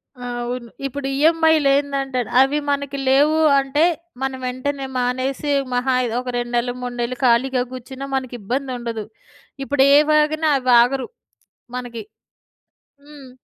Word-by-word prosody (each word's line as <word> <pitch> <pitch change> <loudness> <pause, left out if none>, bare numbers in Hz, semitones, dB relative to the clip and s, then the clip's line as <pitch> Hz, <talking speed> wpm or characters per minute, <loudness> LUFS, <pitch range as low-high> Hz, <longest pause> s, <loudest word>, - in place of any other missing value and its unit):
ఆ! 250 -1 -9 0.2
అవును. 240 0 -5 0.2
ఇప్పుడు 275 +1 -4
ఈఎంఐలేందంటేనా 280 -5 +2
అవి 275 +3 +2
మనకి 280 0 -2
లేవు 290 +4 +4 0.2
అంటే, 275 +3 +1 0.4
మనం 265 -1 -2
వెంటనే 270 +2 -3
మానేసి 255 +3 -1 0.2
మహా 250 +1 +1
అయ్ 245 - -1
ఒక 250 0 -5
2 240 0 -4
నెళ్ళు, 245 +1 -1
3 245 -1 -5
నెళ్ళు 245 +1 -3
ఖాళీగా 250 +1 +2
కూర్చున్నా 260 +2 -8
మనకిబ్బందుండదు. 245 -2 -4 0.6
ఇప్పుడు 280 -1 +2
ఏవాగినా 305 +1 +3
అవాగరు 250 +1 +3 0.7
మనకి. 240 -2 -6 1.0
హ్మ్. 290 -3 -13
265 Hz, 115 wpm, -20 LUFS, 245-280 Hz, 1.0 s, లేవు